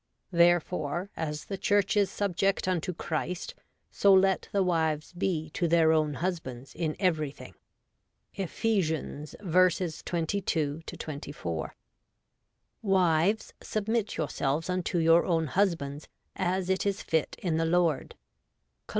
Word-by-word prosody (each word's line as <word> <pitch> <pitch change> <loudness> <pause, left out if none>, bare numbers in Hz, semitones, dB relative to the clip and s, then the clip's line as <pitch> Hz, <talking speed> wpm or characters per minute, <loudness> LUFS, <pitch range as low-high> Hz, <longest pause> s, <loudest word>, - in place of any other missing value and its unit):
therefore, 175 0 +2
as 150 -2 -4
the 195 -2 -5
Church 205 +1 +2
is 205 -2 +3
subject 195 -1 0
unto 180 0 0
Christ, 170 +1 -3 0.4
so 200 - +4
let 190 0 +4
the 200 -1 +2
wives 160 -3 0
be 170 -4 -2
to 175 -1 0
their 165 -1 +4
own 155 -2 +1
husbands 135 -7 -4
in 160 -2 -2
everything' 155 -7 -1 0.8
(Ephes. 170 - -1
v. 185 -1 +3
22 165 -3 -1
24). 140 - -5 0.5
' - - -51 0.2
Wives, 175 +5 +2
submit 215 0 -1
yourselves 155 +1 -1
unto 180 -1 -1
your 165 0 +5
own 165 -3 +1
hus 185 +5 +2
bands, 140 -1 -7 0.3
as 185 0 0
it 190 - +1
is 200 -1 -1
fit 160 -2 0
in 165 -4 -1
the 165 - +1
Lord 165 -4 +1
' 60 0 -50
(Col. - - -47
170 Hz, 130 wpm, -29 LUFS, 155-190 Hz, 0.8 s, your